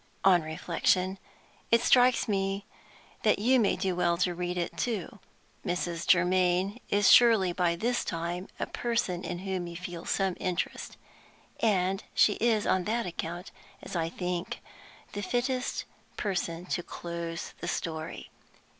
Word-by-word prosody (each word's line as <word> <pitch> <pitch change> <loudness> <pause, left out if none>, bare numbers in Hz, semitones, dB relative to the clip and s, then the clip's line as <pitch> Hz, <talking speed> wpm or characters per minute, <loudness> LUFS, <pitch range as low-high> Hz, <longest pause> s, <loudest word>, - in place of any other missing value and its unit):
On 180 -3 +6
reflection, 180 +4 0 0.5
it 230 0 +5
strikes 250 -1 +5
me 195 -1 -1 0.6
that 215 - +3
you 250 +5 +4
may 210 - +3
do 190 -2 -1
well 175 -1 +2
to 180 0 +1
read 180 +1 -3
it, 175 - -2
too. 210 -5 -3 0.4
Mrs. 175 -3 -2
Germaine 180 +3 +3
is 205 0 +5
surely 220 -7 +6
by 175 -1 +1
this 240 +7 0
time 170 +2 -3
a - - 0
person 225 -7 -1
in 175 - -3
whom 185 -2 -2
you 170 - -8
feel 175 -1 -7
some 195 -2 0
interest. 180 -1 -3 0.6
And 195 -3 +1
she 210 - +5
is 225 -3 +3
on 185 -1 +2
that 230 +2 0
account, 175 +1 -5 0.3
as - - -7
I 165 -1 0
think, 180 0 -3 0.5
the 205 - -3
fittest 250 +5 -1 0.3
person 175 -3 -2
to 180 - -1
close 170 -1 -6
the 170 - -5
story. 160 -2 -4
180 Hz, 145 wpm, -29 LUFS, 175-205 Hz, 0.6 s, On